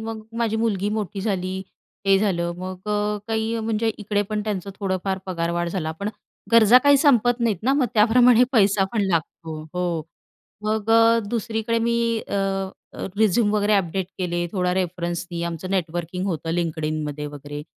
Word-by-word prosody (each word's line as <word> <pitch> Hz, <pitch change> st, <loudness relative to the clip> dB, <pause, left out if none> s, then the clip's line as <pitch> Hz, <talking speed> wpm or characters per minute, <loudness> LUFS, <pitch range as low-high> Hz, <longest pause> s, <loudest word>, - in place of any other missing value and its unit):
मग 220 Hz, 0 st, -5 dB, 0.2 s
माझी 225 Hz, -2 st, 0 dB
मुलगी 205 Hz, -3 st, 0 dB
मोठी 200 Hz, -2 st, -3 dB
झाली 190 Hz, -2 st, -2 dB, 0.5 s
हे 195 Hz, 0 st, +5 dB
झालं. 175 Hz, -4 st, 0 dB
मग 185 Hz, +2 st, -7 dB
अ, 210 Hz, 0 st, 0 dB
काही 225 Hz, +1 st, -1 dB
म्हणजे 225 Hz, 0 st, 0 dB
इकडे 205 Hz, -1 st, 0 dB
पण 210 Hz, -1 st, -1 dB
त्यांचं 200 Hz, -2 st, -3 dB
थोडंफार 190 Hz, -1 st, -1 dB
पगारवाढ 170 Hz, -1 st, -1 dB
झाला 165 Hz, -3 st, -3 dB
पण 200 Hz, -, -1 dB, 0.4 s
गरजा 230 Hz, +2 st, +8 dB
काही 285 Hz, 0 st, +7 dB
संपत 245 Hz, -4 st, +3 dB
नाहीत 230 Hz, -5 st, +1 dB
ना 260 Hz, +4 st, +2 dB
मग 280 Hz, -3 st, +2 dB
त्याप्रमाणे 240 Hz, +2 st, +6 dB
पैसा 200 Hz, -4 st, +4 dB
पण 220 Hz, -, +1 dB
लागतो. 165 Hz, -2 st, -2 dB
हो 175 Hz, -3 st, -1 dB, 0.6 s
मग 215 Hz, 0 st, -1 dB
अ, 230 Hz, 0 st, +6 dB
दुसरीकडे 230 Hz, 0 st, -1 dB
मी 235 Hz, +1 st, +1 dB, 0.3 s
अ, -, -, -3 dB, 0.6 s
अ, -, -, -5 dB
रिझ्यूम 215 Hz, 0 st, +3 dB
वगैरे 210 Hz, 0 st, +2 dB
अपडेट 190 Hz, -1 st, 0 dB
केले 175 Hz, -1 st, -1 dB
थोडा 180 Hz, -2 st, 0 dB
रेफरन्सनी 175 Hz, -1 st, -3 dB
आमचं 170 Hz, +2 st, -5 dB
नेटवर्किंग 175 Hz, 0 st, -2 dB
होतं 165 Hz, -3 st, -2 dB
LinkedInमध्ये 155 Hz, -3 st, -2 dB
वगैरे 145 Hz, 0 st, -7 dB
195 Hz, 155 wpm, -23 LUFS, 175-220 Hz, 0.6 s, गरजा